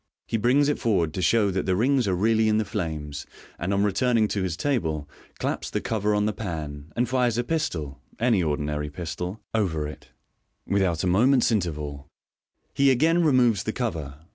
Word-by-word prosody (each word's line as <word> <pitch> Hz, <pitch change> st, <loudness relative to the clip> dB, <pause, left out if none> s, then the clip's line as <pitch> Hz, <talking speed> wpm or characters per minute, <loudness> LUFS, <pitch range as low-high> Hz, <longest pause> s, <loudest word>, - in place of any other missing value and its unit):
He -, -, -3 dB
brings 125 Hz, +6 st, +3 dB
it 150 Hz, -, 0 dB
forward 90 Hz, -9 st, +1 dB
to 90 Hz, -, -3 dB
show 100 Hz, +3 st, +3 dB
that 95 Hz, 0 st, -2 dB
the 95 Hz, -, +2 dB
rings 125 Hz, +3 st, +2 dB
are 95 Hz, -, +1 dB
really 110 Hz, +3 st, +2 dB
in 105 Hz, -, +3 dB
the 110 Hz, -, +1 dB
flames 80 Hz, -8 st, -4 dB
j -, -, -28 dB, 0.3 s
and 90 Hz, +3 st, -2 dB
on 100 Hz, 0 st, +2 dB
returning 110 Hz, +2 st, +2 dB
to 100 Hz, -, -1 dB
his 90 Hz, -3 st, -2 dB
table, 80 Hz, -, -1 dB, 0.3 s
claps -, -, -2 dB
the -, -, -1 dB
cover 105 Hz, -1 st, 0 dB
on 105 Hz, 0 st, +1 dB
the 105 Hz, -, 0 dB
pan, 80 Hz, -7 st, -6 dB
and 120 Hz, +1 st, +1 dB
fires 125 Hz, -2 st, +1 dB
a 120 Hz, -, +1 dB
pistol 85 Hz, -, -3 dB, 0.2 s
(any 115 Hz, -4 st, +2 dB
ordinary 75 Hz, -1 st, -2 dB
pistol) 90 Hz, +6 st, -5 dB
over 85 Hz, -9 st, 0 dB
it 75 Hz, -, -10 dB, 0.6 s
Without 95 Hz, -5 st, +1 dB
a -, -, +1 dB
moment's 120 Hz, +9 st, +4 dB
interval, 75 Hz, -8 st, -2 dB, 0.7 s
he 140 Hz, 0 st, +4 dB
again 160 Hz, +7 st, +3 dB
removes 125 Hz, -8 st, +4 dB
the 110 Hz, -, -3 dB
cover. 80 Hz, -, -3 dB
100 Hz, 190 wpm, -25 LUFS, 80-120 Hz, 0.7 s, moment's